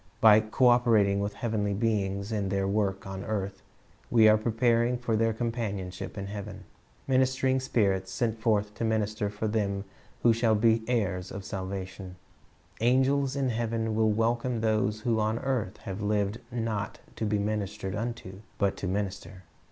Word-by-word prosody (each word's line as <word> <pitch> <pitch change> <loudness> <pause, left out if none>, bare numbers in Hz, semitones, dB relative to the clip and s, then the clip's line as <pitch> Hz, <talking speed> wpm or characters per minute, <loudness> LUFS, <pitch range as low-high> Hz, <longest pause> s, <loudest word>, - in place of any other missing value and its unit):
By 110 -1 +8
co 110 +4 +2
operating 110 -5 +4
with 100 +1 -2
heavenly 105 -4 -1
beings 100 -2 -1
in 100 -3 -1
their 95 0 0
work 100 -1 0
on 95 0 -6
earth, 100 -3 -3 0.5
we 115 -2 +6
are 110 - +7
preparing 115 +2 +2
for 120 -2 -1
their 115 +1 +2
companionship 110 -6 -4
in 100 - -4
heaven. 100 +1 -7 0.4
"Minis 130 0 +2
tering 130 0 +1
spirits, 95 -7 0
sent 115 +1 -1
forth 105 -2 +1
to 115 - -5
minister 110 -2 0
for 105 +2 -3
them 100 -2 -1 0.4
who 120 - +6
shall 115 -1 +2
be 110 +1 +3
heirs 95 -7 -1
of 100 -1 -7
salvation,"^ 95 -1 -6 0.7
angels 135 +2 +3
in 135 -2 0
heaven 115 -1 -1
will 110 0 +3
welcome 115 +2 0
those 110 -1 +1
who 115 -1 +1
on 110 +1 +1
earth 120 -7 -2
have 95 +1 -6
lived 105 +1 0
"not 110 -3 -3 0.2
to - - -4
be 105 -1 +1
ministered 100 -2 -2
unto, 105 -4 -5 0.2
but 100 -2 +1
to 95 - -3
minister." 95 -1 -4
110 Hz, 160 wpm, -28 LUFS, 100-115 Hz, 0.7 s, By